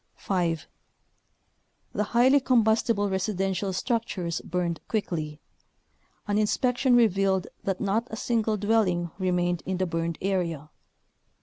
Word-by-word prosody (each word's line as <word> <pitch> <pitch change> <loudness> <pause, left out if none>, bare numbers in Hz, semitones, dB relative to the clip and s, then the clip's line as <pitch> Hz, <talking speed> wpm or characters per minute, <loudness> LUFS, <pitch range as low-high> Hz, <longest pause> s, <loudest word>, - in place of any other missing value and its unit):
5. 170 -6 -1 1.3
The 210 - 0
highly 255 +6 +4
combustible 225 -4 +2
residential 190 0 -1
struc 230 +5 -1
tures 170 -3 -4
burned 175 -1 -2
quickly. 155 -8 -3 0.9
An 205 0 +1
inspection 245 +4 +2
revealed 195 -4 +3 0.2
that 195 -2 -1
not 215 +4 0
a - - -5
single 220 -1 0
dwelling 195 -5 +1
remained 175 -2 0
in 190 -1 -2
the 185 - +1
burned 165 -1 -2
area. 170 -6 -2
195 Hz, 115 wpm, -27 LUFS, 175-220 Hz, 1.3 s, highly